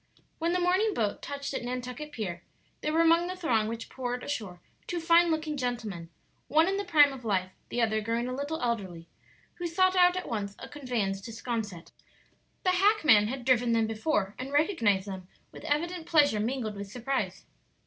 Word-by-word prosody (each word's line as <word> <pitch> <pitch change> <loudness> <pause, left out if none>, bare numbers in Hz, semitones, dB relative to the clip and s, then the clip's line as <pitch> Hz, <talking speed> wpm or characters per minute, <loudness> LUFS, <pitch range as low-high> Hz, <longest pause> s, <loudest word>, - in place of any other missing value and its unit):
When 335 +1 +1
the 360 - +1
morning 375 +4 +2
boat 210 -3 -1
touched 280 0 -5
at - - -3
Nantucket 250 +4 -5
pier 185 -9 -4 0.4
there 305 - -1
were 325 +1 +3
among 335 +1 +4
the 365 - -4
throng 235 -12 +1
which 230 0 -5
poured 250 -1 -4
ashore 210 -11 -4 0.3
two 350 - -2
fine 335 +1 +5
looking 315 -1 -1
gentlemen 225 -10 -3 0.4
one 315 +5 +4
in 390 +1 0
the 405 - -1
prime 295 -6 +5
of 260 -2 -10
life, 190 -4 0 0.2
the 240 - 0
other 220 -1 +1
growing 230 +3 -1
a 255 - -3
little 285 +4 -3
elderly 190 -8 -3 0.5
who 350 - -2
sought 370 +2 +2
out 360 0 +5
at 365 - -4
once 205 -4 -3
a - - -9
conveyance 235 -9 -2
to 230 - -8
'Sconset. 220 -6 -5 0.7
The 365 - +3
hackman 355 - +5
had 255 +1 -5
driven 245 -2 +3
them 225 -1 +3
before, 220 -2 -1
and 260 +2 -5
recognized 235 - +2
them 190 -2 -7 0.2
with - - -12
evident 335 +3 -1
pleasure 290 -9 +4
mingled 225 -1 -2
with 200 0 -7
surprise. 250 +4 -3
250 Hz, 190 wpm, -29 LUFS, 215-320 Hz, 0.7 s, fine